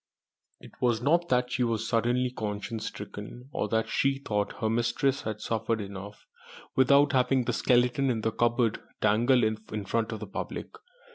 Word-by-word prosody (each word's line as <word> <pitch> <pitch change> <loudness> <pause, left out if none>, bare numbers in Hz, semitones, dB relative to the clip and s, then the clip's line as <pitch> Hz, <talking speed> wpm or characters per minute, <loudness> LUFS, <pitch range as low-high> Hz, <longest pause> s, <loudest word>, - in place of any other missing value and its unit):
It - - -14
was 120 -3 +2
not 170 +7 +2
that 125 0 +2
she 125 - +1
was 115 -1 -1
suddenly 120 +2 +1
conscience 110 0 -4
stricken, 105 +5 -8
or 105 - -1
that 110 0 +1
she 135 0 +1
thought 105 -6 -2
her 110 - -1
mistress 120 +4 +1
had 110 -1 -5
suffered 115 0 -1
enough 100 0 -8 0.5
without 140 +2 +5
having 130 0 +3
the - - 0
skeleton 125 +2 +2
in 115 -3 0
the 110 - 0
cupboard 120 0 +1 0.2
dangled 120 +4 +3
in 110 -1 -2
front 115 +2 -1
of 110 - -4
the 105 - -5
public. 100 - -5
115 Hz, 165 wpm, -28 LUFS, 110-125 Hz, 0.5 s, without